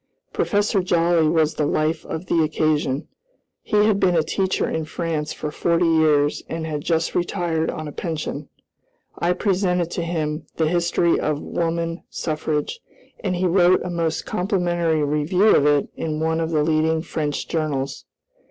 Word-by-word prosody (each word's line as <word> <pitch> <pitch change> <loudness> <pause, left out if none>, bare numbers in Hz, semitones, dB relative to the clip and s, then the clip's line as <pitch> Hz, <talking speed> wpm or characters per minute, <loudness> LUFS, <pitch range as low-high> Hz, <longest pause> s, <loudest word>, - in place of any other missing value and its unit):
Professor 205 -1 +1
Joly 170 -2 +2
was 160 -1 +2
the 150 - 0
life 155 +2 0
of 160 +3 -5
the 170 - +2
occasion. 150 -3 0 0.5
He 210 0 +2
had 210 -2 +2
been 180 -3 +3
a 160 - +3
teacher 190 +4 0
in 160 - -2
France 160 -2 -3
for 150 - -5
forty 170 +2 +1
years 155 -3 +3
and 165 0 -3
had 150 -2 -3
just 165 +1 0
retired 170 -2 -1
on 155 -2 -5
a - - -6
pension. 155 -3 -4 0.7
I 175 +1 +2
presented 180 -3 0
to - - -2
him 160 -2 -3
"The 160 - +1
History 170 0 +2
of 150 -1 -1
Woman 165 +1 -2
Suffrage," 155 - -2 0.4
and 185 -3 0
he 180 +1 0
wrote 180 0 +4
a 180 - -4
most 165 -2 -1
complimentary 175 -4 0
review 150 +8 +3
of 145 - +4
it 145 -1 +2
in 155 -1 -3
one 160 +1 0
of 160 - -1
the 155 -2 +1
leading 160 +1 +1
French 150 -3 -3
journals. 145 -4 -2
165 Hz, 160 wpm, -22 LUFS, 155-175 Hz, 0.7 s, wrote